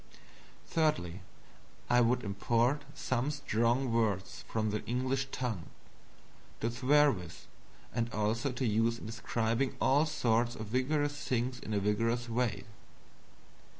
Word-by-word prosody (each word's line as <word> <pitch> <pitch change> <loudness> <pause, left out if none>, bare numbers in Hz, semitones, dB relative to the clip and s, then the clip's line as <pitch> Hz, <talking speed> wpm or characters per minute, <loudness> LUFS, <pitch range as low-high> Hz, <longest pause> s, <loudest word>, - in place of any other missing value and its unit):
Thirdly, 100 - 0 0.7
I 125 0 +5
would 125 +1 +2
import 115 +7 +1
some 130 +2 -1
strong 125 -3 +1
words 105 -4 0
from 110 -1 -1
the 105 - -2
English 130 +3 0
tongue 115 -9 -3 0.9
to 115 - -1
swear 145 +4 +4
with, 90 -7 -8 0.5
and 115 0 -1
also 110 +6 0
to 125 +1 -2
use 115 +1 +2
in - - -10
describing 115 +3 -1
all 145 +4 +4
sorts 120 -5 +1
of 110 - -5
vigorous 145 +5 0
things 125 0 0
in 110 - -7
a - - +2
vigorous 115 +4 0
way. 115 -4 -1
120 Hz, 125 wpm, -32 LUFS, 110-130 Hz, 0.9 s, I